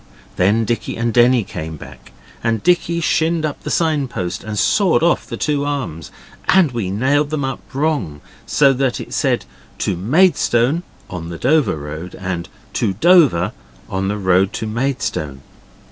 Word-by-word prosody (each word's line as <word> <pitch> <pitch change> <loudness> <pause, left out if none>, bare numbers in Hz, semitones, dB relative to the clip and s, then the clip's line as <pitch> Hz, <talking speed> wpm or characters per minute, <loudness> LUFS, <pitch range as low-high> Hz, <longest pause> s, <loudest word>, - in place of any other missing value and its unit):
Then 105 +5 +2
Dicky 120 +1 -2
and 120 0 -1
Denny 120 0 +4
came 80 -3 -6
back, - - -13 0.3
and 115 -2 0
Dicky 170 -1 +2
shinned 160 0 +1
up 150 - -4
the - - -5
sign 155 -5 +1
post 90 -7 -4
and 105 0 -5
sawed 180 - +3
off 170 - +2
the - - -5
two 145 -2 0
arms, 135 - -4 0.4
and 180 -7 +5
we 115 -6 -3
nailed 135 +9 +1
them 150 -3 -1
up 135 - -3
wrong, 140 - -1 0.3
so 140 -2 +4
that 130 -1 0
it - - -8
said - - 0 0.3
'To 95 - -1
Maidstone' 135 - +2 0.3
on 85 -2 -6
the 85 - -6
Dover 130 - +2
Road, 80 +4 -7
and 90 -3 -4 0.2
'To 105 -5 0
Dover' 145 - +4 0.4
on 95 0 -2
the 105 +1 -1
road 95 -1 +2
to - - -3
Maidstone. 110 - -2
120 Hz, 160 wpm, -19 LUFS, 95-150 Hz, 0.4 s, and